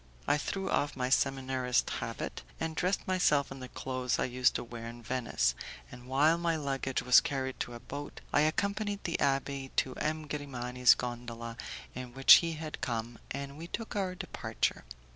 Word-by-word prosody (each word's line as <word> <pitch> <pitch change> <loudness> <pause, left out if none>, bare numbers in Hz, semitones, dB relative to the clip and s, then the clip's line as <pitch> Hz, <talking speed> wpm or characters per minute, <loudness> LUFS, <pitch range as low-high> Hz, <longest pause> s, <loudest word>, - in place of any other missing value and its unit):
I - - +4
threw 195 +5 -3
off 145 -5 0
my 125 0 -1
seminarist's 130 -2 +1
habit, - - -4 0.2
and 160 0 -2
dressed 185 +3 0
myself 150 -7 +3
in 135 - -7
the 130 -1 -8
clothes 130 -1 -2
I - - +1
used 125 0 +2
to - - -1
wear 115 -1 -7
in 120 0 -9
Venice, 115 - +1 0.4
and, 125 0 -11
while 150 +6 +4
my 170 -1 +1
luggage 135 -3 -1
was 125 - +8
carried 135 -5 -3
to 120 - -3
a - - -7
boat, 145 +4 -7
I 145 - +5
accompanied 200 +6 0
the 170 - -1
abbé 135 -1 0
to 130 - +1
M. 155 +1 -1
Grimani's 125 -4 +2
gondola 120 -1 -5 0.4
in 125 -1 -7
which 135 0 +10
he 165 -1 -2
had 155 0 -6
come, 120 -4 -3
and 140 +1 -5
we 165 - -6
took 225 +5 -5
our 190 -3 -1
departure. 175 - -2
135 Hz, 180 wpm, -31 LUFS, 125-155 Hz, 0.4 s, which